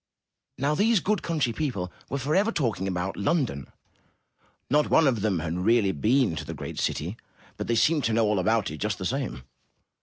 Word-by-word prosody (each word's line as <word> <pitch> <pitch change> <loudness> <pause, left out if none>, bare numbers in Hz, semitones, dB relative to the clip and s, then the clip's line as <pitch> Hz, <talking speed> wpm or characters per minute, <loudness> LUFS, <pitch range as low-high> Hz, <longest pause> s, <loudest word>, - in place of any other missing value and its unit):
Now, 140 +3 +1
these 210 +6 +3
good 210 +4 0
country 150 -8 0
people 110 -11 -3 0.2
were 140 - -2
forever 155 - +1
talking 115 - -1
about 95 0 -2
London. 100 - -1 1.0
Not 150 +2 +2
one 160 - +5
of 120 -7 +2
them 105 -3 +1
had 85 +2 -3
really 105 +1 +3
been 110 - +2
to 80 - -4
the - - -6
great - - -6
city, 90 +9 -2 0.4
but - - -5
they 115 - +1
seemed 150 +4 +3
to 115 - +1
know 115 0 +3
all 105 -2 +1
about 110 +1 +1
it 75 - -6
just - - -2
the - - -5
same. 65 +1 -3
115 Hz, 190 wpm, -26 LUFS, 95-150 Hz, 1.0 s, one